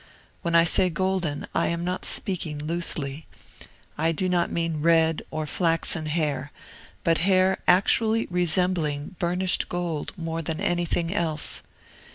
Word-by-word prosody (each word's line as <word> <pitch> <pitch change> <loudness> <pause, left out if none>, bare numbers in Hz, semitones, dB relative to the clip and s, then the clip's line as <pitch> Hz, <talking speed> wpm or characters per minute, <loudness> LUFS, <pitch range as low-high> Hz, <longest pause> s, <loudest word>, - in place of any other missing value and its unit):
When 170 -2 -1
I 165 - +7
say 180 +2 +3
golden, 180 -4 -1
I - - +1
am 170 0 -2
not 180 +1 -3
speaking 170 -6 0
loosely. 150 -2 -3 0.7
I 165 +1 +2
do 185 +3 -1
not 175 -1 +1
mean 165 -2 -2
red 165 0 +3
or 155 0 -3
flaxen 165 0 0
hair, 145 -3 -1 0.5
but 165 -1 +2
hair 185 +1 +3
actually 220 +5 +3
resembling 175 -3 +1
burnished 180 +2 0
gold 175 -4 -3
more 165 -1 -3
than 160 0 -4
anything 175 -2 0
else. 160 -6 -1
170 Hz, 135 wpm, -25 LUFS, 160-180 Hz, 0.7 s, I